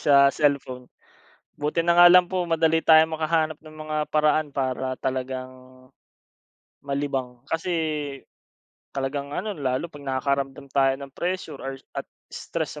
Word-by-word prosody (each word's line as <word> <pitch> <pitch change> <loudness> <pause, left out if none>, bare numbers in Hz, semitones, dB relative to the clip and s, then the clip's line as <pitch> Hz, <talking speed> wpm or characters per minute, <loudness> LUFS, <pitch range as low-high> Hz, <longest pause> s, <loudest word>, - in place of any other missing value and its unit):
sa 140 -1 +5
cellphone. 135 -4 -1 0.7
Buti 150 +3 0
na 170 +1 +3
nga 175 - +10
lang 180 0 +7
po 185 -2 -1
madali 165 -1 +2
tayong 160 0 +6
makahanap 155 -1 0
ng 155 -1 -14
mga 155 0 -5
paraan 155 -1 +1
para 130 -1 -1
talagang 130 0 -3 1.3
malibang, 140 -3 -3
kasi 165 +2 -2 1.3
talagang 140 +1 -2
ano 215 +2 -2
lalo 135 -4 -2
pag 145 - -11
nakakaramdam 135 +1 -1
tayo 135 -1 +3
ng 140 0 -10
pressure 175 -3 -4
or 135 0 -5 0.2
at - - -5 0.2
stress - - -4
145 Hz, 130 wpm, -25 LUFS, 135-160 Hz, 1.3 s, nga